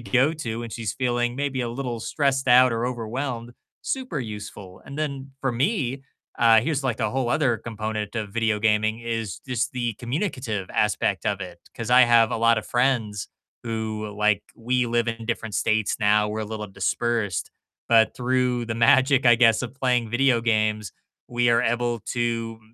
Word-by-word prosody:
go 130 +5 +2
to 115 -6 -4
when 115 -1 -6
she's 110 -2 -3
feeling 120 -1 -1
maybe 140 -2 -2
a 120 - -2
little 120 -1 -4
stressed 135 +2 0
out 125 0 +6
or 115 +1 -1
overwhelmed, 120 0 -4 0.3
super 255 - -3
useful. 100 -4 -8
And 140 - -9
then 140 -3 -4
for 135 - 0
me, 135 - -1 0.4
uh, 115 -1 +6
here's 140 +1 -2
like 120 -4 -1
a - - 0
whole 130 -2 -1
other 130 -4 +2
component 110 -1 -5
of 110 -3 -3
video 110 0 0
gaming 110 0 +2
is 115 -5 -4
just 125 0 -2
the 120 -3 -2
communicative 120 - -3
aspect 105 -2 0
of 100 -2 -1
it. 90 -2 -8
'Cause 115 -1 -5
I 125 +1 +8
have 115 -2 +5
a - - -1
lot 115 0 +3
of 110 - -7
friends 120 -6 0 0.3
who, 110 -2 -4
like, 105 0 +2
we 125 +2 0
live 120 0 0
in 115 0 -4
different 110 -2 -3
states 110 -1 +1
now. 105 0 +3
We're 110 +1 -3
a - - -2
little 105 0 -5
dispersed. 105 +2 -1 0.4
But 115 -1 +4
through 125 -1 0
the 115 - -3
magic, 130 +3 +4
I 120 -1 +7
guess, 115 -1 +4
of 120 - -5
playing 125 -4 0
video 120 0 +3
games, 110 -2 0 0.4
we 120 0 +1
are 115 +1 +4
able 120 0 0
to, 115 -2 -3
115 Hz, 180 wpm, -24 LUFS, 110-125 Hz, 0.4 s, I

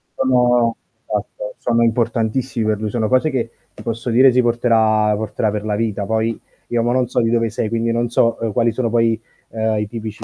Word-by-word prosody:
Sono 125 -3 +2 0.3
esatto, - - -4
sono 115 0 0
importantissimi 115 +1 0
per 110 -1 0
lui, 110 -1 -2
sono 115 -3 0
cose 130 +5 +2
che 120 -4 -2 0.2
ti - - -12
posso 115 +2 -4
dire 130 +3 +6
si 125 +1 +3
porterà 110 -3 +2
porterà 110 +1 -2
per 105 0 -4
la 105 - -1
vita, 105 -2 -2
poi 110 +1 -1 0.3
io 120 -1 0
mo 120 - +1
non 125 0 +1
so 125 +1 0
di 115 -1 +1
dove 115 -1 +1
sei, 110 +1 -2
quindi 115 0 0
non 120 +1 0
so 115 0 +2 0.2
quali, 115 +2 +2
ehm, 110 - -5
sono 120 -2 0
poi 115 -1 +2 0.6
i 105 0 -1
tipici 110 -1 -7
115 Hz, 205 wpm, -19 LUFS, 110-120 Hz, 0.6 s, dire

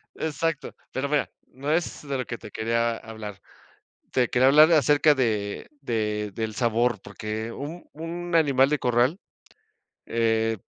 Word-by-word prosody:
E - - -3
exacto, 160 0 -2 0.2
pero 135 +2 -2
mira, 150 -2 +1 0.2
no 140 +4 -3
es 160 -3 -1
de 140 - -1
lo 130 - -3
que 115 - -5
te 105 - -11
quería 115 +1 0
hablar. 110 -3 -9 0.7
Te 125 -2 +2
quería 130 +1 +4
hablar 155 +4 +7
acerca 150 0 +5
de 110 -6 -1
de 105 -4 -1
del 110 -1 -3
sabor, 120 -1 +1
porque 110 +2 -5
un 155 +7 -7
un 170 +2 -5
animal 140 -5 +4
de 150 - +2
corral, 125 +6 +2 0.9
eh, 115 -1 +1
125 Hz, 150 wpm, -25 LUFS, 110-150 Hz, 0.9 s, hablar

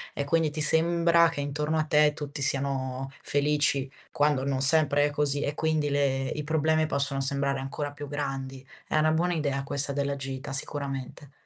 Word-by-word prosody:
e 145 - -2
quindi 165 +1 +1
ti 155 +1 -3
sembra 170 +2 +3
che 165 -3 -5
intorno 150 +2 -2
a 155 - +1
te 150 -1 +3
tutti 145 -1 -5
siano 135 -1 0
felici, 145 -1 +1 0.2
quando 145 -2 +1
non 135 -1 -2
sempre 145 0 +4
è - - 0
così 145 -1 +2
e 145 - -2
quindi 155 -2 -1
le 135 -2 0
i 150 - -5
problemi 155 +1 +1
possono 140 -1 +1
sembrare 140 0 +1
ancora 140 +2 -5
più 145 0 -9
grandi. 135 -2 -5 0.2
È - - -1
una 155 0 +2
buona 175 +3 0
idea 140 -4 -2
questa 140 +1 +1
della 140 0 -2
gita, 135 0 -6
sicuramente. 140 -1 -3
145 Hz, 180 wpm, -26 LUFS, 135-150 Hz, 0.2 s, sempre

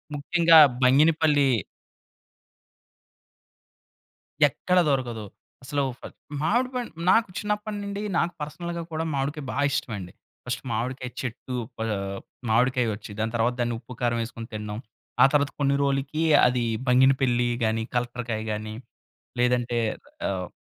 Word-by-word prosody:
ముఖ్యంగా 165 +3 +5 0.3
బంగినపల్లి 150 +2 +4 3.0
ఎక్కడా 180 +6 +1
దొరకదు. 120 -6 -1 0.4
అసలు 145 +2 -1 0.2
ఫ - - -28 0.4
మావిడి 240 +11 +2
పండు 245 -2 -3 0.2
నాకు 225 +2 +4
చిన్నప్పడినిండి, 210 -1 -3 0.2
నాకు 175 +1 +1
పర్సనల్‌గా 170 +3 -5
కూడా 160 0 -2
మావిడికాయ 140 +2 -2
బా - - -5
ఇష్టమండి. 100 -9 -4 0.3
ఫస్టు 125 0 -3
మావిడికాయ 125 +3 -3
చెట్టు 125 +1 -5 0.2
ప - - -20 0.7
మావిడికాయొచ్చి, 115 -2 +1
దాని 110 +1 -1
తర్వాత 120 +2 +2
దాన్ని 120 -1 0
ఉప్పు, 125 +1 -11
కారం 120 -1 +1
యేసుకొని 115 0 -8
తినడం. 105 -1 -5 0.5
ఆ - - +10
తర్వాత 145 -1 +2
కొన్ని 140 -1 +2
రోలుకి 140 +3 0 0.2
అది 125 -1 0 0.2
బంగినపిల్లి 125 -1 +4 0.2
గానీ, 110 0 0
కలెక్టర్‌కాయ 120 -2 -2
గానీ 110 0 -4 0.7
లేదంటే 120 -1 +1 0.5
ఆహ్, 95 -2 -2
130 Hz, 115 wpm, -25 LUFS, 120-155 Hz, 3.0 s, ఆ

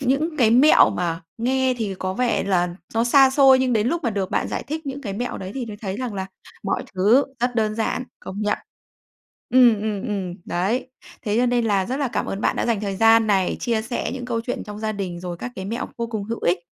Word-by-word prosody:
những 280 +5 0
cái 235 -6 +4
mẹo 260 +7 +6
mà 170 -1 -2 0.2
nghe 260 +2 +1
thì 205 -4 -2
có 185 0 -3
vẻ 245 -3 0
là 180 -3 +1 0.2
nó 230 +1 +2
xa 265 +2 +6
xôi, 270 -1 +6
nhưng 260 -1 +1
đến 215 -1 +2
lúc 335 +1 -1
mà 235 - +1
được 195 -2 -2
bạn - - 0
giải - - -3
thích 310 +2 -5
những 275 +1 -4
cái 200 -4 -4
mẹo 245 +5 -4
đấy 190 0 -6
thì 255 -3 -4
mới 210 -2 -7
thấy 200 -2 -5
rằng 250 -4 -4
là 190 -1 -3 0.4
mọi 195 - -1
thứ 215 +9 +4 0.2
rất 245 0 0
đơn 215 -2 +1
giản, 225 +3 -1 0.2
công 195 +2 -7
nhận. 210 - 0 1.0
Ừm, 240 -5 +6
ừm, 210 -1 -2
ừm, 195 -6 -3
đấy. 205 +10 -1 0.3
Thế 210 -2 -1
cho 250 - +3
nên 240 -1 +1
là 200 -4 +1
rất 260 +3 -2
là 280 -3 -1
cảm - - -2
ơn 195 - -4
bạn - - +1
đã - - 0
dành 225 -3 +1
thời 200 -2 -3
gian 225 +1 +5
này, 195 -3 +1
chia 230 -3 0
sẻ 240 +2 -3
những 250 -2 -6
câu 235 -2 -2
chuyện 245 +2 -4
trong 210 0 -8
gia 215 0 -2
đình, 185 -4 -5
rồi 180 -1 -5
các 245 +8 -6
cái 190 - -5
mẹo 230 +5 -3
vô 235 0 -2
cùng 215 -3 -4
hữu 230 +2 -5
ích. 175 +1 +2
225 Hz, 250 wpm, -22 LUFS, 195-250 Hz, 1.0 s, mẹo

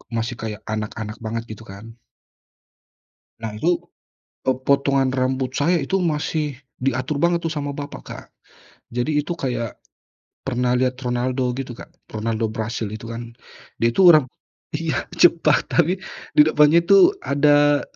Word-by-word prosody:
masih 115 +1 -2
kayak 110 -1 -6
anak-anak 110 0 -5
banget 115 0 -4
gitu 110 +1 -10
kan. 100 +4 -10 1.5
Nah 110 -1 -4
itu, 170 +7 +1 0.7
eee, 130 - +2
potongan 140 -1 +3
rambut 130 0 -1
saya 145 +7 +2
itu 190 +8 0
masih 150 -3 -1 0.2
diatur 130 +2 -1
banget 170 +2 +2
tuh 165 - -1
sama 145 -2 -3
bapak, 145 0 -7
Kak. - - -8 0.7
Jadi 145 +5 0
itu 170 +4 -4
kayak, 125 -6 -4 0.7
pernah 125 -1 +1
lihat 130 0 +1
Ronaldo 125 +1 -1
gitu, 130 -2 -5
Kak? - - -11 0.2
Ronaldo 110 +1 -2
Brasil 110 0 -3
itu 115 +1 -8
kan, 115 0 -7 0.5
dia 115 - +4
itu 185 +11 +3
orang 155 -7 +7 0.5
iya, 165 0 -1 0.2
cepak 170 -1 +4
tapi 175 +2 +3 0.4
di - - +10
depannya 155 +2 +4
tuh 390 - +6
ada 145 0 +4
130 Hz, 140 wpm, -22 LUFS, 115-150 Hz, 1.5 s, di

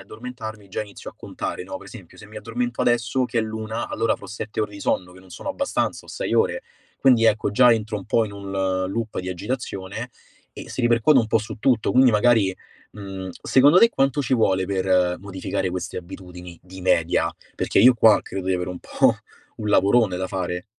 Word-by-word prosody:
addormentarmi 110 -1 -9
già 95 - -4
inizio 100 -1 -10
a - - -25
contare, - - -5
no, - - -6
per - - -14
esempio, - - -13
se - - -12
mi 105 +1 -13
addormento 120 +3 -3
adesso 120 +1 +1
che 120 - -2
è - - +4
l'una, 110 +1 -4
allora 115 - 0
avrò - - -11
7 105 0 -5
ore 105 -1 -1
di 100 - -10
sonno, 90 -1 -1
che 95 - -15
non 95 -1 -19
sono - - -8
abbastanza, 280 -1 -2
o - - -21
6 - - -4
ore. - - +1 0.4
Quindi, 125 -4 +4
ecco, 110 -1 +2
già 120 +3 +6
entro 110 -1 -2
un 95 - -10
po' 115 +1 +2
in 105 - -7
un, 100 -1 -7
ehm, 95 -1 0
loop 115 -2 -3
di 90 - -6
agitazione, 105 +2 -5 0.4
e - - -10
si - - -4
ripercuote 120 +4 +4
un 115 - +2
po' 110 - +2
su 110 +1 -7
tutto, 120 -5 +2
quindi 130 -1 +6
magari, 105 -3 +3 0.4
mhmm, 95 -2 -7
secondo 145 +6 +5
te 230 +4 +6
quanto 135 - +1
ci 130 - -3
vuole 95 -5 +2
per 95 -2 +1
modificare 95 -1 -3
queste 90 0 -4
abitudini, 90 -1 -10
di 95 +1 -12
media? 90 -2 +2 0.2
Perché - - 0
io 125 +6 +8
qua 110 -2 +5
credo 95 -1 -6
di 95 - +2
avere 90 0 -3
un 90 - -7
po' - - +2 0.4
un 105 -1 -4
lavorone 100 -1 +3
da 95 +1 -2
fare. 90 -1 -4
105 Hz, 210 wpm, -23 LUFS, 95-120 Hz, 0.4 s, io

